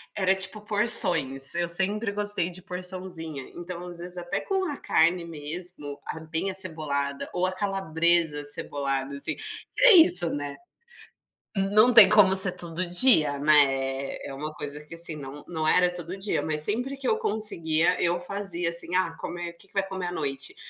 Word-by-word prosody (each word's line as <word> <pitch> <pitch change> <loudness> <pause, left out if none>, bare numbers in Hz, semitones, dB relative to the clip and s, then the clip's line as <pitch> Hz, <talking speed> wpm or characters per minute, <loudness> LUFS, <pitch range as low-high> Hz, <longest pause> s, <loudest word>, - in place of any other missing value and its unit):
era 190 -1 +2
tipo 190 +3 -3
porções, 185 - +2
eu 175 0 -1
sempre 200 +5 0
gostei 205 -4 -1
de 180 +1 -10
porçãozinha, 180 -5 -7
então, 175 0 -8
às 175 -1 -9
vezes, 180 +1 -8
até 175 0 -4
com 385 -1 -2
a - - -6
carne 170 +2 +1
mesmo, 155 -1 -5
ah, 160 - -6
bem 160 +4 -4
acebolada 155 -7 -2
ou 180 +1 0
a 185 - -1
calabresa 170 -5 0
acebolada, 140 -1 -1
assim, 140 - -4
que 435 +3 -7
é - - +8
isso, 180 - +7
não 145 -1 -4
é? 140 - -7 1.0
Não 210 +5 +3
tem 215 -4 +9
como 200 -3 +5
ser 190 -1 +9
todo 175 0 -5
dia, 175 - +4
né, 150 0 +5
é 135 0 -4
é - - -8
uma 150 +3 -6
coisa 150 0 -7
que, 165 - -11
assim, 165 -1 -4
não 145 0 -10
não 160 -2 -3
era 180 +1 +3
todo 175 +1 -8
dia, 195 +2 -2
mas 155 -1 -1
sempre 245 - -1
que 275 - -5
eu 445 - +1
conseguia, 180 - 0
eu 175 0 0
fazia, 180 -2 -4
assim: 170 +1 -3
"Ah, 170 -3 0
comer 175 0 -6
o 170 - -24
que 195 - -16
que - - -26
vai 195 - 0
comer 190 -2 -5
à - - -4
noite? 140 -5 -3
175 Hz, 185 wpm, -25 LUFS, 155-195 Hz, 1.0 s, tem